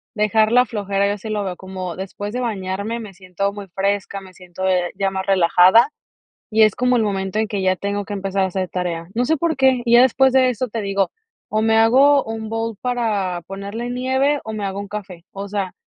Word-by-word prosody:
dejar 215 +1 +2
la 250 +1 +5
flojera, 200 -4 -1
yo 200 - 0
así 205 +1 -7
lo 210 -1 -1
veo 185 -2 -4
como 185 -1 -6
después 205 +2 -6
de 250 - -2
bañarme, 205 -1 -3
me 215 -4 -9
siento 190 +2 -3
muy 200 -1 -8
fresca, 195 +2 -2
me 190 -1 -14
siento, 180 +1 -6
eh, 180 -1 +1
ya 195 0 0
más 190 0 -4
relajada, 185 +6 +5 0.6
y 220 0 +2
es 215 -2 +4
como 250 0 +2
el 230 - +2
momento 195 -1 -2
en 220 - 0
que 200 -2 -2
ya 185 0 +2
tengo 200 +1 -3
que 205 - -6
empezar 195 -1 -1
a - - +3
hacer 185 -1 -3
tarea. 170 -2 -3
No 240 +3 0
sé 320 - +2
por 320 0 -1
qué, 265 -2 +3
y 235 0 +4
ya 240 - +8
después 265 +1 +4
de 260 0 +4
eso 250 +1 -3
te 225 - -4
digo: 195 -1 0 0.4
"O 215 - 0
me 225 0 +3
hago 265 +6 +5
un 225 0 -5
bowl 225 -1 -3
para 215 -8 -1
ponerle 200 +5 -5
nieve 260 +3 +1
o 220 - -5
me 215 -1 -4
hago 195 0 -3
un 200 - -6
café", 195 -4 -8
o 200 +1 -6
sea, 195 -2 -3
205 Hz, 230 wpm, -20 LUFS, 190-230 Hz, 0.6 s, ya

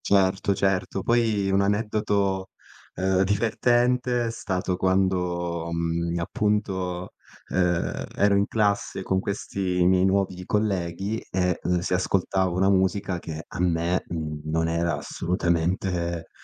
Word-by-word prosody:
Certo, 95 0 +2
certo. 95 0 0
Poi, 110 -4 +2
un 95 +1 +3
aneddoto, 100 -2 0 0.5
ehm, 95 +1 +1
divertente 120 +4 +2
è 115 - -2
stato 95 -5 -2
quando, 90 -3 0
mhmm, 85 0 -1
appunto, 95 -3 -1 0.4
ehm, 90 -2 0
ero 100 0 +3
in 100 +1 +2
classe 105 -2 0
con 95 - +1
questi 95 -2 -1
miei 90 0 +4
nuovi 95 -1 0
colleghi 100 0 -1
e 90 -1 0
l 90 - +1
si 90 - -2
ascoltava 95 0 +1
una 95 +3 +2
musica 95 -1 +1
che 80 -1 -7
a - - -8
me, 85 0 +1
mhmm, 75 -2 -4
non 80 +1 0
era 85 +1 0
assolutamente, 85 -1 -1
95 Hz, 125 wpm, -25 LUFS, 85-100 Hz, 0.5 s, miei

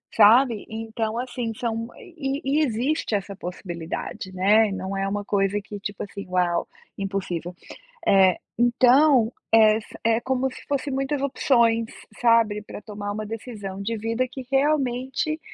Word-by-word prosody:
sabe? 225 +1 +5
Então 225 0 -3
assim, 245 -2 -3
são, 230 0 -3
e 310 - -5
e 275 +3 +1
existe 250 +1 -1
essa 200 0 -3
possibilidade, 180 0 -6
né, 205 +4 +4
e - - -5
não 190 +1 -4
é 195 0 -1
uma 205 +1 -2
coisa 200 0 +1
que 205 0 -8
tipo 205 0 -5
assim: 200 0 -8
"Uau, 180 -1 0 0.3
impossível", 185 -3 -3 1.0
então, 245 +1 +5 0.2
é 220 -1 +6
sa - - -14
é 225 0 +3
como 260 +1 0
se - - -11
fosse 280 0 -1
muitas 270 +1 -1
opções, 235 -4 +2 0.3
sabe, 230 -3 +3
para 210 - -9
tomar 205 -1 -6
uma 215 +1 -4
decisão 205 -3 -6
de 225 +3 -2
vida 230 +4 -1
que 260 0 -8
realmente 270 +1 0
225 Hz, 145 wpm, -24 LUFS, 205-255 Hz, 1.0 s, é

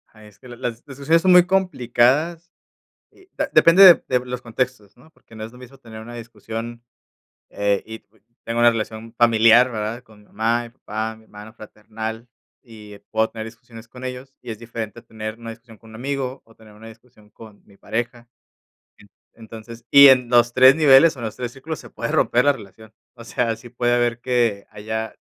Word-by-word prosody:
Es 105 -2 -18
que - - -16
las 120 -1 -12
las 120 -1 -6
discusiones 140 +4 0
son 185 +1 +3
muy 180 -1 +7
complicadas, 165 -2 0 0.6
eh, 380 -1 -23 0.2
depende 170 +4 +6
de 180 -3 +8
de 125 -1 0
los 125 0 -6
contextos, 115 -3 -4
¿no? 140 +6 -21
Porque 115 - -22
no 110 -1 -8
es 110 - -10
lo 125 - -15
mismo 125 +2 -15
tener 115 -4 -12
una 120 +2 -11
discusión, 115 0 -8 0.7
eh, 100 -1 -1
y 110 0 -10 0.4
tengo 115 +1 -3
una 120 0 +6
relación 110 0 -6
familiar, 115 +1 +5
¿verdad? 110 +2 -5
Con 110 -2 -20
mi 105 - -22
mamá, 115 +3 -1
mi 120 - -11
papá, 110 -2 -6
mi 110 - -20
hermano 105 +1 -14
fraternal, 110 +1 -8 0.3
y 105 -4 -14
puedo 110 0 +1
tener 110 -1 -7
discusiones 115 0 -14
con 125 +2 -13
ellos, 130 +1 -8
y 125 - -8
es 110 - -9
diferente 115 -1 -7
tener 110 -1 -8
una 115 -1 -9
discusión 115 -1 -16
con 110 - -19
un - - -12
amigo 135 +1 -4
o 115 - -23
tener 110 -1 -18
una 110 +2 -14
discusión 110 -1 -19
con 105 0 -16
mi 100 -1 -22
pareja. 120 +2 -5 1.1
Entonces 115 +1 -12
y 140 0 +9
en 130 -2 +4
los 120 0 +3
3 130 +2 +6
niveles 150 0 +5
o - - -12
en 115 - -5
los 110 - -6
3 125 -1 -6
círculos 150 +5 -8
se - - -13
puede 115 - -5
romper 125 +2 +2
la 145 - +4
relación. 110 -1 -14 0.2
O 115 - -12
sea, 115 0 -2
sí 115 +2 -14
puede 120 0 -1
haber 120 -1 -1
que 120 -6 -1
haya 110 +1 -6
115 Hz, 195 wpm, -21 LUFS, 110-125 Hz, 1.1 s, y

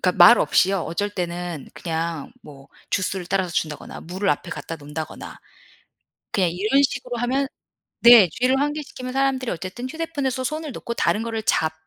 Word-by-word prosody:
그러니까 180 - +2
말 235 - +9
없이요. 190 0 +3
어쩔 200 +6 -2
때는 175 -5 -4
그냥 165 -3 -4
뭐 140 -2 -14 0.2
주스를 185 -1 -1
따라서 190 -1 0
준다거나 155 -3 -3
물을 185 +4 -3
앞에 175 - -2
갖다 165 - -6
놓는다거나. 150 +1 -7 0.9
그냥 185 -4 +2
이런 215 +10 +2
식으로 255 -3 -2
하면 260 +4 0 0.5
네 235 -5 +9
주의를 250 +9 +1
환기시키면 290 -3 -3
사람들이 265 -2 0
어쨌든 185 +9 -5
휴대폰에서 285 -5 -2
손을 305 +2 -3
놓고 235 - -5
다른 220 - +1
거를 225 -1 -3
잡 160 -6 +1
205 Hz, 380 characters per minute, -23 LUFS, 175-255 Hz, 0.9 s, 말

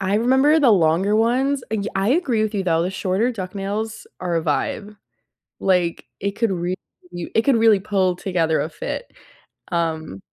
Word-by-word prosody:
I 195 +1 0
remember 265 +7 +4
the 270 -5 +5
longer 190 +2 +3
ones 255 +4 +1
y 220 -2 -1
I 195 +4 +1
agree 260 -9 +1
with 215 0 -2
you, 200 - 0
though, 165 -2 +2
the 180 - -1
shorter 195 +5 0
duck 185 -4 -6
nails 215 +3 -4
are 175 -2 -1
a 165 - 0
vibe. 205 +7 -2 0.6
Like, 180 -3 +1
it 200 0 -1
could 220 0 0
re 180 0 -2 0.4
u 175 -1 -6
it 225 - +4
could 270 -2 +3
really 225 -3 +5
pull 190 -3 0
together 170 -4 0
a - - -2
fit. - - -5 0.6
Um 160 - -2
200 Hz, 180 wpm, -21 LUFS, 180-225 Hz, 0.6 s, the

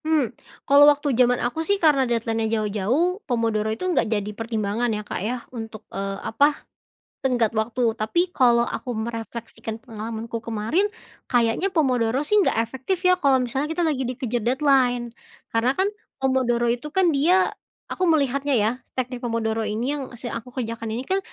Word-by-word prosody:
Mmm. 310 -7 +1 0.3
Kalau 285 +1 +7
waktu 290 -1 +1
zaman 245 0 +4
aku 245 +7 -2
sih 400 +5 +1
karena 290 -8 +3
deadline-nya 225 -1 0
jauh-jauh, 225 - 0
pomodoro 225 -3 0
itu 220 +11 -3
enggak 350 -11 +1
jadi 210 -2 -1
pertimbangan 225 +1 -2
ya, 210 -1 -3
Kak, - - -4
ya, 235 +5 -1 0.2
untuk, 225 -2 -7
eee, 195 0 -3
apa, 285 +5 +3 0.6
tenggat 240 -4 +1
waktu, 230 +1 +1
tapi 345 +12 0
kalau 240 -2 +4
aku 250 - -4
merefleksikan 225 0 -5
pengalamanku 225 -1 -6
kemarin, 230 - 0 0.5
kayaknya 240 +10 +2
pomodoro 255 -7 +2
sih 420 - +1
nggak - - +1
efektif 265 - -3
ya 365 - +6
kalau 275 -7 +3
misalnya 265 +4 -1
kita 325 - -4
lagi 290 -5 0
dikejar 245 -1 -2
deadline. 250 -2 +2 0.4
Karena 230 +3 +3
kan 380 +1 +3 0.3
pomodoro 255 -3 +1
itu 240 +5 -1
kan 360 -1 +3
dia 350 +7 +4 0.4
aku 370 - -3
melihatnya 280 -2 +1
ya, 210 +2 +2 0.3
teknik 250 -1 -3
pomodoro 225 -1 -1
ini, 235 +7 -1
yang 275 -3 -5
si - - -9
aku 230 +1 -6
kerjakan 230 -2 -4
ini - - -4
kan 385 +1 +1
245 Hz, 165 wpm, -24 LUFS, 225-280 Hz, 0.6 s, Kalau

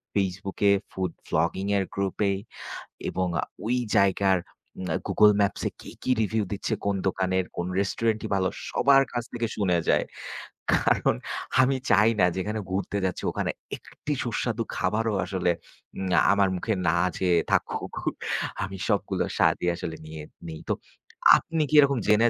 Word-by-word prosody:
Facebook 95 0 -2
এ - - +7 0.2
food 95 -2 -2 0.2
blogging 85 +5 0
এর 95 - +2
গ্রুপে 100 +1 0 0.8
এবং 95 0 -1
আ - - -9 0.2
ওই 125 +2 +2 0.2
জায়গার 95 -1 +4 0.4
উম 95 - -4 0.2
Google 105 -1 +5
Maps 100 - +1
এ - - -11
কে - - -10
কি - - -2
রিভিউ 110 0 +1
দিচ্ছে, 100 - -1
কোন 100 -1 +1
দোকানের 95 0 0
কোন 85 - -2
রেস্টুরেন্টি 110 +2 0
ভালো 95 -1 +2 0.2
সবার 135 0 +5
কাছ 120 -1 -2
থেকে 120 -1 -1
শুনে 90 -4 +2
যাই। - - +4 0.7
কারণ - - +3 0.5
আমি 130 +1 +3
চাই 110 +4 +6
না, 90 - +6
যেখানে 105 +3 -2
ঘুরতে 100 +1 -1
যাচ্ছি 95 - -2
ওখানে - - -1 0.3
একটি 150 - -6
সুস্বাদু 115 -1 -1
খাবারও 110 +4 0
আসলে 90 -3 0 0.5
উম 95 - -2 0.2
আমার 100 -1 +4
মুখে 110 +5 -1
না 80 - +3 0.2
যেয়ে 90 -2 +3
থাকুক, - - 0 0.7
আমি 95 +1 -5
সবগুলোর - - 0
স্বাদই 90 - +2
আসলে 85 -1 -5
নিয়ে 80 -1 -8 0.2
নেই। 80 -1 -6
তো - - +3 0.6
আপনি 165 -1 -2
কি - - -7
এরকম 140 -2 +5
জেনে 110 +3 +5
100 Hz, 155 wpm, -26 LUFS, 95-110 Hz, 0.8 s, এ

